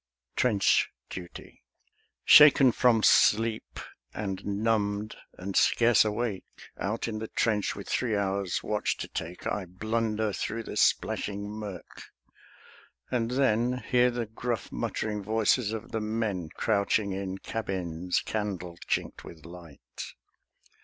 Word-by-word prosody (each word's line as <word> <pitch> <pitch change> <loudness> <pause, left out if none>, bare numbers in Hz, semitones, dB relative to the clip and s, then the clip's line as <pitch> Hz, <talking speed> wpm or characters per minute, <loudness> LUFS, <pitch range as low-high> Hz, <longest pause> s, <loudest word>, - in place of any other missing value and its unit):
TRENCH 105 -6 +3 0.2
DUTY 90 -2 -9 0.6
Shaken 140 -3 +8
from 115 -2 +3
sleep, 110 +1 +3 0.4
and 95 -3 -4
numbed 105 0 -1 0.2
and 95 +1 -6
scarce 120 -1 +5
awake, 110 -2 -2 0.4
Out 105 +6 -2
in 110 -2 -4
the 110 - -5
trench 105 -3 0
with 100 - -8
three 115 -4 0
hours' 100 -2 -1
watch 105 0 -1
to - - -5
take, 85 +3 -6
I 100 -2 -2
blunder 110 +3 -1
through 115 +3 -3
the - - -7
splashing 100 0 +1
mirk; 105 -4 -8 1.1
and 115 -3 0
then 125 -2 +2
Hear 125 0 +2
the 120 -1 -3
gruff 115 +2 -4
muttering 105 -1 -3
voices 110 +2 +1
of 110 +1 -6
the 110 - -2
men 105 -6 -2
Crouching 100 0 0
in 95 0 -4
cabins 90 -5 -3
candle 95 -5 -4
chinked - - -2
with 80 -2 -12
light. 85 -8 -10
105 Hz, 125 wpm, -28 LUFS, 95-115 Hz, 1.1 s, Shaken